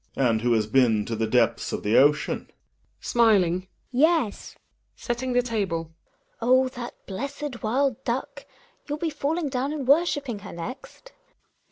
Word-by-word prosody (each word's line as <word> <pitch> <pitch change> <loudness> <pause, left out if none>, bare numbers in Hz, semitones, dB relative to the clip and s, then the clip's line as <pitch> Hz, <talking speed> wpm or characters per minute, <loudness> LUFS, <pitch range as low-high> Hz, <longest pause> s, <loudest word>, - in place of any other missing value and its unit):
And 115 -4 +2
who 120 0 +2
has 110 -2 +2
been 110 -2 +3
to 115 - -3
the 110 0 -1
depths 115 0 +1
of - - -4
the 105 +3 +1
ocean? 150 +2 +3
Hedvig - - -31 0.5
(smiling). 190 -6 +3 0.2
Yes. 295 -3 +1
GiNA - - -30 0.4
{setting 245 +1 -3
the 245 0 +3
table). 190 -9 -2 0.5
Oh! 255 +2 +4
that 240 -1 -7
blessed 275 +5 -5
wild 265 +3 0
duck 245 +2 -3
I - - -20 0.4
Youll 295 - -2
be 325 +1 -2
fa 290 -1 -3
lling 315 -2 -1
down 260 +2 -1
and 290 -4 -4
worshipping 280 -6 +2
he 200 - -11
r - - -9
next. 250 - -9
235 Hz, 170 wpm, -25 LUFS, 165-275 Hz, 0.5 s, Oh